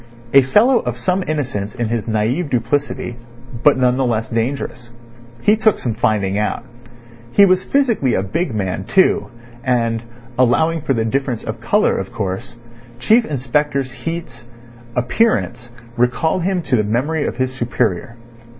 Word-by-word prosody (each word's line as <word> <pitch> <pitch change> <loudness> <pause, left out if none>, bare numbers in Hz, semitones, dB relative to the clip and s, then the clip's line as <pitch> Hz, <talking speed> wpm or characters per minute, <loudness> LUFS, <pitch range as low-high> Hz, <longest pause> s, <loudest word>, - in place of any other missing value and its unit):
A 135 - +9
fellow 220 - +4
of - - -4
some 185 +1 0
innocence 130 -9 -3
in 120 -3 -2
his 115 -1 -2
naive 115 +9 0
duplicity, 125 0 -1 0.4
but 145 0 +5
none 125 -1 +2
the 135 - +1
less 115 -3 -1
dangerous. 120 0 -3 0.5
He 210 - +5
took 220 -1 +2
some 120 - -2
finding 105 -3 0
out. 105 - -2 0.7
He 200 - +7
was 185 -1 +3
physically 235 - +1
a 95 - 0
big 125 - -2
man, 95 -3 -3
too, 190 - +2 0.3
and 115 -3 0 0.4
(allowing 160 +6 +3
for 135 - 0
the 110 -1 0
difference 130 -1 -1
of 110 +1 -6
colour, 205 - +2
of - - -5
course) 110 +2 -4 0.4
Chief 220 - +3
Inspector 140 +1 0
Heat's 130 -2 -7 0.5
appearance 125 - 0 0.3
recalled 125 +9 +1
him 180 0 0
to 135 - +1
the 110 - +2
memory 135 +9 0
of - - -4
his 130 0 -1
superior. 120 -3 -2
125 Hz, 150 wpm, -18 LUFS, 115-160 Hz, 0.7 s, A